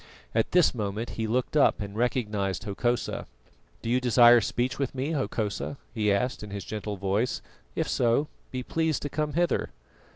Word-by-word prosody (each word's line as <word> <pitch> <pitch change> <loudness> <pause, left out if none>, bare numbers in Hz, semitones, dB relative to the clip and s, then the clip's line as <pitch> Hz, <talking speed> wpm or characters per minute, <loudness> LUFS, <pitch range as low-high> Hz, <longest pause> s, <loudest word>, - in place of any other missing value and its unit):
At 115 0 +1
this 180 -2 +5
moment 105 0 -3
he 110 -1 -2
looked 125 +6 -1
up 145 - +4
and 100 -1 -5
recognised 105 -5 0
Hokosa. 120 +4 -1 0.6
"Do 115 - -2
you 125 +1 +3
desire 120 -1 +7
speech 125 +5 -1
with 135 -1 -2
me, 135 +4 -1
Hokosa?" 130 -4 -2 0.2
he 105 -3 +1
asked 125 +6 0
in 105 - -7
his 100 -3 -5
gentle 105 0 -4
voice. 100 +6 0 0.3
"If - - 0
so, 120 +5 +2 0.2
be 130 -1 -4
pleased 160 +1 0
to 145 - -2
come 150 0 -2
hither." 175 +2 +1
120 Hz, 170 wpm, -27 LUFS, 105-130 Hz, 0.6 s, desire